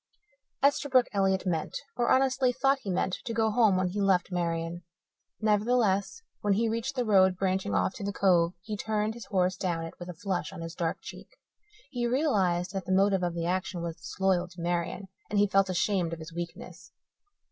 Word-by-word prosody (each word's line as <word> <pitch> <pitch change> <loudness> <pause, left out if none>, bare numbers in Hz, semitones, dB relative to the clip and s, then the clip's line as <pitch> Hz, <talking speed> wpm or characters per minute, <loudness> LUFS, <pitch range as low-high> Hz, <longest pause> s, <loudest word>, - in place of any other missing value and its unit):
Esterbrook 275 -3 +4
Elliott 190 -1 +1
meant, 165 -4 -1 0.2
or 240 -1 +1
honestly 260 -1 +3
thought 270 +2 +2
he 210 - -7
meant, 185 0 0
to 230 - -4
go 220 -1 +2
home 215 -4 +4
when 185 -1 +1
he 200 +3 -3
left 190 -2 +2
Marian. 170 -1 -2 0.6
Nevertheless, 215 - +1 0.2
when 205 -1 +1
he 225 +4 +1
reached 230 +5 -2
the 250 -2 0
road 190 -3 +4
branching 190 +1 0
off - - +1
to 205 - -6
the 200 - -1
Cove 180 -4 +3
he 215 +2 -4
turned 215 +1 -1
his 230 -3 -9
horse 185 -1 +1
down 175 -4 -2
it 165 - -8
with 175 0 -8
a 180 - -7
flush 190 +2 -3
on 185 -3 -8
his 165 0 -6
dark 170 -2 -2
cheek. - - -10 0.6
He 240 -3 -1
realized 195 - +1
that 190 -2 -4
the 185 - -3
motive 195 0 +3
of 175 -1 -1
the 165 -1 -2
action 180 0 -2
was 165 -1 -4
disloyal 185 -2 0
to 175 0 -15
Marian 175 +3 -2 0.2
and 210 - -1
he 205 - +5
felt 195 -1 +2
ashamed 180 -2 0
of 165 - -6
his 160 +1 -9
weakness. 170 0 -8
190 Hz, 200 wpm, -28 LUFS, 175-220 Hz, 0.6 s, he